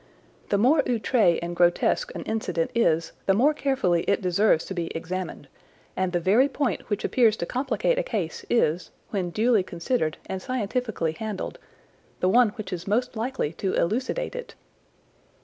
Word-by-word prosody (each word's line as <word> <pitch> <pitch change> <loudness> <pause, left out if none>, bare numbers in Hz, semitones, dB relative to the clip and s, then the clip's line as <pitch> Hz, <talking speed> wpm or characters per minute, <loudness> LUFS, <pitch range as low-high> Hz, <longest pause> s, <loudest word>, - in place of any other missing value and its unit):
The 200 - +2
more 270 +9 +4
outré 225 -6 +2
and 175 0 -4
grotesque 175 - +2
an - - -5
incident 180 -7 -2
is 165 -8 +2 0.2
the 195 - +4
more 280 +8 +4
carefully 265 - +1
it - - +2
deserves 185 -2 +2
to - - -5
be 170 -3 -2
examined, 175 -3 -5 0.5
and 185 -1 0
the 175 - +1
very 215 +11 +4
point 280 -3 -2
which 205 -1 -1
appears 225 -4 +3
to - - -2
complicate 265 - 0
a - - +3
case - - -3
is, 180 -7 +1 0.2
when 190 -4 -1
duly 220 +3 +3
considered 170 -1 -2
and 190 -1 -5
scientifically 220 -6 -2
handled, 210 +4 -5 0.6
the 185 - +2
one 240 +2 +5
which 210 -4 -6
is 175 +1 -6
most 240 +5 0
likely 225 - -2
to 190 +3 -2
elucidate 260 - -1
it. - - -7
210 Hz, 165 wpm, -25 LUFS, 175-250 Hz, 0.6 s, one